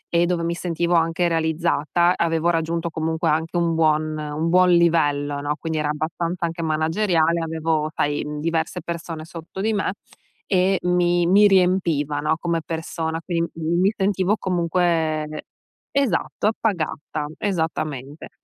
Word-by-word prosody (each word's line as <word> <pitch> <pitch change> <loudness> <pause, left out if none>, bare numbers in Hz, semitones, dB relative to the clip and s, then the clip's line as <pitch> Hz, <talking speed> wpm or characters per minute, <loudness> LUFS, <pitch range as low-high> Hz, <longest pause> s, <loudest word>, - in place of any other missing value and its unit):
e 170 +1 +4
dove 175 -1 0
mi 170 0 0
sentivo 170 0 -1
anche 165 +1 +2
realizzata, 165 +1 +1
avevo 165 0 +1
raggiunto 165 +1 -1
comunque 160 +1 -1
anche 160 +3 0
un 170 -1 +1
buon 155 -1 +2
un 150 +1 -3
buon 180 +1 +5
livello, 145 -5 +2
no? 145 +1 -1
Quindi 160 -1 -2
era 150 -1 -1
abbastanza 170 +3 -2
anche 170 0 -4
manageriale, 165 +1 +1
avevo, 160 -1 -1
sai, 145 0 0
mhmm, 150 0 -5
diverse 165 +1 -1
persone 165 -2 -5
sotto 165 +3 -9
di 220 +2 +1
me. 200 -2 -1 0.5
E 190 0 +2
mi 175 -1 +2
mi 200 +4 +6
riempivano, 165 -6 +2
come 170 -1 0
persona. 160 0 -3
Quindi, 170 -2 -1
mi 170 +4 +1
sentivo 195 0 +1
comunque 165 -4 0 0.5
esatto, 235 -6 0
appagata, 160 -8 -2
esattamente. 155 -6 -3
165 Hz, 135 wpm, -22 LUFS, 155-175 Hz, 0.5 s, mi